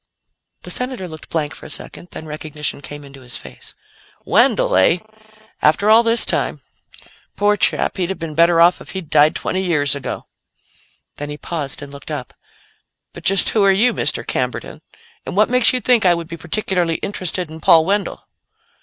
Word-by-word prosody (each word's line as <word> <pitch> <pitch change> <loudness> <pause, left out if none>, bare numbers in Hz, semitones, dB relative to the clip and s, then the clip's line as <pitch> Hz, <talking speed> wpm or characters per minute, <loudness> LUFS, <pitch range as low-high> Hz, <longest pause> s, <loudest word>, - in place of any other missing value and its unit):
The - - -6
Senator 250 -7 -3
looked 155 -2 -11
blank 150 -3 -2
for - - -10
a - - -13
second, 175 - -4
then 160 - -9
recognition 150 -1 -4
came 145 +1 -8
into 135 -1 -14
his 125 -1 -4
face. 65 -1 -10 0.5
"Wendell, - - +3
eh? 95 - +4 0.6
After 180 +8 +3
all 225 +1 +8
this 230 0 +5
time. - - -1 0.8
Poor 205 0 +2
chap; 205 - +1
he'd 180 -2 -1
have 190 - -3
been 165 -2 -6
better 170 +2 +4
off 175 +1 +5
if - - -10
he'd 180 -5 -7
died 150 +1 +5
twenty 185 - -2
years 150 -6 +1
ago." 140 -2 -5 0.9
Then 145 0 -5
he 145 - -6
paused 145 -3 -5
and 140 - -10
looked 140 - -11
up. 135 -7 -5 0.8
"But - - -11
just 195 -1 +3
who 215 - +2
are 195 - +5
you, 220 +6 +3
Mr. - - -1
Camberton? - - -3 0.5
And - - -5
what 215 +3 +3
makes 250 -1 +5
you 255 - 0
think 245 0 +3
I 180 -2 +4
would 170 -1 -6
be 170 - -7
particularly 175 -1 -1
interested 180 -3 -4
in 160 0 -10
Paul 160 +1 +6
Wendell?" 200 +2 -1
170 Hz, 185 wpm, -19 LUFS, 150-195 Hz, 0.9 s, all